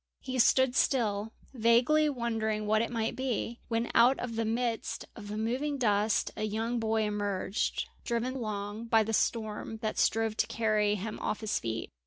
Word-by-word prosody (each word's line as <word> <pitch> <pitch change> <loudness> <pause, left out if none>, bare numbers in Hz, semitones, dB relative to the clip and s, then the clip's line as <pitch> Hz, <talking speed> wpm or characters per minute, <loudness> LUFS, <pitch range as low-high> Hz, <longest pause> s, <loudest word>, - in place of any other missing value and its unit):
He 260 -1 -3
stood 260 +1 +4
still, 220 -6 +1 0.2
vaguely 250 +6 +4
wondering 225 -5 -1
what 215 +1 +3
it 230 - -1
might 225 -2 -2
be, 245 -2 -2
when 230 0 -1
out 245 +3 +6
of 240 -2 -4
the 225 0 0
midst 230 0 -2
of 205 -3 -9
the 210 +1 -4
moving 260 +7 -1
dust 210 -3 +2
a - - -6
young 225 +3 -1
boy 220 0 +1
emerged, 205 -1 -1 0.2
driven 235 +2 -1
along 215 -2 -4
by 225 -1 +4
the 225 +1 -3
storm 220 0 -1
that 215 - -1
strove 225 -1 +2
to - - +2
carry 215 -2 +1
him 210 +2 -5
off 210 - -2
his 220 - 0
feet. 115 0 -4
225 Hz, 175 wpm, -30 LUFS, 215-235 Hz, 0.2 s, out